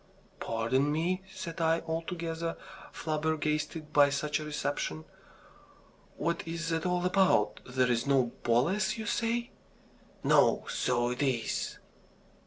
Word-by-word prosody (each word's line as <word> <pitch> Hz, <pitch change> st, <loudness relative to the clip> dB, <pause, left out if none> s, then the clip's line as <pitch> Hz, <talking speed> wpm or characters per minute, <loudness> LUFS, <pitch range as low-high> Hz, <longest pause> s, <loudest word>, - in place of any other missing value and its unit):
"Pardon 125 Hz, +6 st, +1 dB
me!" 175 Hz, +5 st, 0 dB
said 170 Hz, -4 st, -6 dB
I, 165 Hz, 0 st, +3 dB
altogether 165 Hz, 0 st, -3 dB, 0.3 s
flabbergasted 155 Hz, 0 st, -2 dB
by 145 Hz, -1 st, +6 dB
such 145 Hz, +1 st, -1 dB
a -, -, -5 dB
reception, 145 Hz, -, -3 dB, 1.1 s
"what 170 Hz, +2 st, 0 dB
is 165 Hz, 0 st, -3 dB
it 165 Hz, +2 st, 0 dB
all 180 Hz, 0 st, 0 dB
about? 190 Hz, +1 st, +3 dB
There's 125 Hz, -1 st, +1 dB
no 130 Hz, -4 st, +3 dB
Boles, 190 Hz, -, +2 dB
you 220 Hz, -, -4 dB
say?" 235 Hz, +2 st, -1 dB, 0.7 s
"No. -, -, +4 dB
So 120 Hz, -1 st, +1 dB
it 125 Hz, -, -3 dB
is." 130 Hz, -5 st, -1 dB
155 Hz, 115 wpm, -30 LUFS, 135-170 Hz, 1.1 s, by